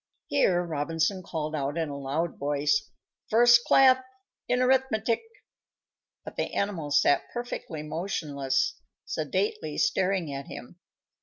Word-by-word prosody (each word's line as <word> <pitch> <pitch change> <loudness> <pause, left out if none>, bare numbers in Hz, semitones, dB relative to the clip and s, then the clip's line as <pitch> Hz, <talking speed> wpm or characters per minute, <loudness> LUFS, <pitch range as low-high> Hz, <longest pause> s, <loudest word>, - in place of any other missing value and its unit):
_ - - -66 0.3
Here 175 -2 +3
Robinson 165 +4 -1
called 155 -3 -4
out, 145 +1 -2
in 160 -2 -1
a 140 - -5
loud 140 +5 -3
voice, 145 0 0 0.4
"First 240 +1 +6
class 260 -1 +6 0.4
in 250 - +1
arithmetic!" 250 -3 +2 1.0
but - - -9
the - - -2
animals 165 -8 +1
sat 145 - +2
perfectly 240 -10 -5
motionless, 155 - -2 0.3
sedately 430 +1 -2
staring 190 - +1
at 140 0 -6
him. 170 +8 -10
170 Hz, 125 wpm, -27 LUFS, 145-235 Hz, 1.0 s, First